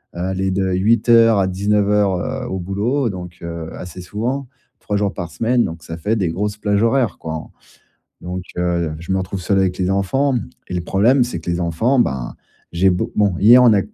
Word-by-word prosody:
heu, - - -6
elle 95 - -4
est 95 0 0
de 95 0 0
8:00 115 +3 +4
à 95 - +2
19:00 100 0 +1 0.3
heu, - - -5
au 95 -4 -3
boulot 110 +8 -1
donc, 90 -2 -8
heu, 85 -1 -5
assez 90 0 -9
souvent. 120 +9 -3 0.3
3 105 - -3
jours 100 -1 0
par 85 -2 -6
semaine 120 +1 +1
donc 80 0 -7
ça 80 0 -7
fait 105 +7 -1
des 90 -5 0
grosses 105 +4 -2
plages 105 -1 0
horaires, 120 -1 +1
quoi. 80 -1 -6 0.7
Donc, 90 +1 -5 0.2
heu, 85 -3 0
je 85 +3 -5
me 95 - +1
retrouve 95 0 -4
seul 95 +2 +1
avec 95 -1 0
les 90 0 0
enfants, 130 +9 +1 0.3
et 90 - -5
le 90 - -1
problème 120 +8 +3
c'est 120 -9 -4
que 85 - -10
les 85 +1 -1
enfants, 100 +11 +1
ben, 65 - -1 0.4
j'ai 95 +3 +3
beau 90 - -1
bon 100 -3 +2
hier 120 +5 +7
on 120 - +6
a 100 - +4
95 Hz, 210 wpm, -19 LUFS, 90-110 Hz, 0.7 s, hier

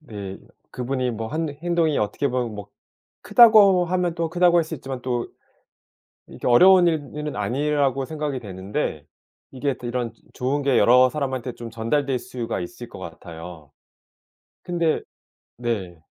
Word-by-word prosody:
네 100 -9 -8 0.4
그분이 125 0 -2
뭐 110 0 -5
한 160 +4 -2
행동이 160 +1 0
어떻게 105 +7 -1
보면 125 -3 -2
뭐 105 -2 -8 0.5
크다고 210 -6 +7
하면 180 -1 0
또 165 -1 -1
크다고 175 +1 +3
할 170 - +4
수 160 +1 -6
있지만 135 -2 -6
또 120 -2 -2 1.0
이게 - - -6
어려운 180 +9 +7
일은 155 -4 -2
일은 150 -1 -4
아니라고 135 +4 0
생각이 150 -2 -3
되는데 95 - -4 0.5
이게 135 +1 -2
이런 120 -1 -2 0.2
좋은 135 +3 -1
게 135 -2 +3
여러 125 +2 +6
사람한테 130 -4 -3
좀 115 0 -8
전달될 125 +4 -1
수가 115 -2 -5
있을 85 - -8
것 - - -10
같아요. 80 -3 -10 0.9
근데 170 -3 0 0.6
네. 95 -9 -4
130 Hz, 285 characters per minute, -23 LUFS, 115-155 Hz, 1.0 s, 크다고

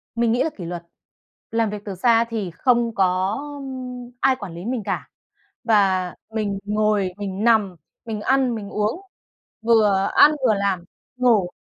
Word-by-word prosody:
Mình 235 -1 +2
nghĩ 245 - +2
là 320 - 0
kỷ 180 - -9
luật, 175 0 -5 0.7
làm 225 -1 +1
việc 210 0 -5
từ 195 -2 -5
xa 230 +4 +4
thì 210 -6 -3
không 235 +4 +1
có, 185 +2 +1 0.2
ưm, 250 -2 -7
ai 265 -1 +4
quản 200 -8 -8
lý 175 +4 -8
mình 240 -2 -2
cả, - - -3 0.6
và 190 -5 +2 0.2
mình 205 -3 -1
ngồi, 210 -2 +1
mình 200 0 -4
nằm, 215 -6 +3 0.3
mình 220 -2 -4
ăn, 260 +1 +2
mình 205 -2 -6
uống, 210 - -1 0.6
vừa 210 -4 +3
ăn, 295 - +8 0.2
vừa 215 - +4
làm, 195 -3 -1 0.3
ngủ, 225 -8 +3
215 Hz, 165 wpm, -22 LUFS, 195-235 Hz, 0.7 s, ăn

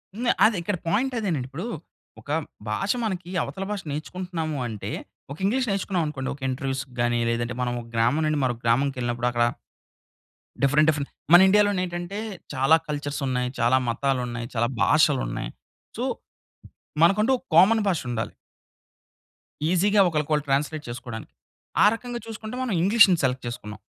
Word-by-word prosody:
హ్మ్. 240 +1 +1
అది. 220 -1 +4
ఇక్కడ 180 +1 -2
పాయింట్ 240 +9 +1
అదేనండి. 165 - -2
ఇప్పుడూ, 165 - -5 0.5
ఒక - - -17 0.4
భాష 195 - 0
మనకి 185 -5 -3
అవతల 195 - -5
భాష 200 -2 -3
నేర్చుకుంటున్నాము 160 0 -4
అంటే, 110 -3 -5 0.4
ఒక 145 - -6
ఇంగ్లీష్ 250 +4 +1
నేర్చుకున్నాం 190 -3 0
అనుకోండి. 135 -3 -4
ఒక 140 - -20
ఇంటర్వ్యూస్‌కి 135 0 -3
గాని 120 0 +1
లేదంటే, 120 +1 -1
మనం 120 -1 -1
ఒక 115 - -13
గ్రామం 120 +7 +2
నుండి 155 -1 +1
మరొక 120 -2 -1
గ్రామంకెళ్ళినప్పుడు 120 -1 +1
అక్కడ, 120 0 +2 1.2
డిఫరెంట్, 145 +3 +4
డిఫరెంట్ 145 -2 -1 0.2
మన 175 - +11
ఇండియాలోనేంటంటే 190 -2 +1 0.4
చాలా 135 +4 +5
కల్చర్సున్నయి, 140 -4 -2
చాలా 120 +2 +4
మతాలున్నయి, 120 -2 -1
చాలా 120 +1 +2
భాషలున్నయి. 145 - +2 0.5
సో, - - -2 1.0
మనకంటూ 210 +8 +4
ఒక 245 - -25
కామన్ 215 +6 +6
భాషుండాలి. 120 - -2 1.4
ఈజీగా 200 +3 +4
ఒకళ్ళకొళ్ళు 150 -1 0
ట్రాన్స్‌లేట్ 150 +3 0
చేసుకోడానికి. 120 -2 -7 0.5
ఆ - - +7
రకంగా 240 +1 -5
చూసుకుంటే 225 +1 -7
మనం 240 -6 -1
ఇంగ్లీష్‌ని 195 -2 +6
సెలెక్ట్ 130 0 0
చేసుకున్నాం. 110 -3 -7
150 Hz, 135 wpm, -25 LUFS, 125-195 Hz, 1.4 s, మన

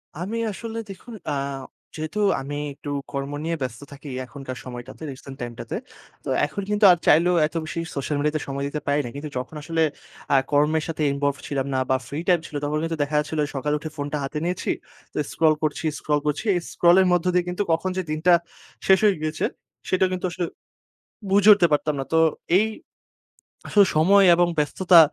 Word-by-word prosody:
আমি 195 +8 -4
আসলে 225 +3 -6
দেখুন 210 +5 -10 0.2
আ - - 0 0.6
যেহেতু 155 +6 -4 0.2
আমি 145 +2 -5 0.2
একটু 145 - -9 0.2
কর্ম 140 +1 -3
নিয়ে 165 +1 -1
ব্যস্ত 125 0 -4
থাকি, 145 +1 -11 0.2
এখনকার 130 -1 -8
সময়টাতে 125 +4 -8
রিসেন্ট 135 +1 -10
টাইম 120 -1 -4
টাতে। - - -5 0.5
তো - - -5 0.2
এখন 200 - -5
কিন্তু 210 0 +3
আর 175 - +4
চাইলেও 175 +3 +5
এত 155 - -19
বেশি 165 +2 -4 0.2
সোশ্যাল 140 +2 -2
মিডিয়াতে 150 +1 0
সময় 140 0 -3
দিতে 150 0 -4
পারি 145 +1 +2
না। - - -4
কিন্তু 150 +1 -5
যখন 130 +5 -5
আসলে 165 0 -1 0.5
আ - - +6 0.2
কর্মের 150 +2 +3
সাথে 160 -1 -4
ইনভলভড 140 0 -1
ছিলাম 140 -1 -2
না 130 - +1
বা 130 - +4
ফ্রি 145 - -4
টাইম 180 -2 +5
ছিল, 150 - -11
তখন 150 +1 0
কিন্তু 165 0 -2
দেখা 150 +1 -3
যাচ্ছিল 155 +1 -3 0.2
সকালে 150 +3 0
উঠে 155 - -6
ফোনটা 145 +1 -2
হাতে 135 +2 -4
নিয়েছি। 180 0 -1 0.4
তো - - -8
স্ক্রল 160 -1 +4
করছি, 155 +1 -1
স্ক্রল 150 -1 +1
করছি। 150 +7 -1
এই - - +2
স্ক্রল 175 +1 +5
এর 185 - +3
মধ্য 175 0 +1
দিয়ে 180 0 +2
কিন্তু 180 +3 -1
কখন 165 +3 +1
যে, 185 - +1
দিনটা 160 +4 +3 0.5
শেষ 190 0 +6
হয়ে 200 - +5
গিয়েছে, 155 +1 -1 0.4
সেটা 185 0 +3
কিন্তু 185 0 -2
আসলে 175 0 -2 0.9
বুঝে 200 +1 +5
উঠতে 190 -4 +5
পারতাম 150 0 +1
না। 135 - -2
তো 160 - +4 0.4
এই 220 - +2 1.0
আসলে 205 -2 +5
সময় 195 +5 +6
এবং 175 0 +3
ব্যস্ততা 175 +4 +5
155 Hz, 195 wpm, -24 LUFS, 145-180 Hz, 1.0 s, আ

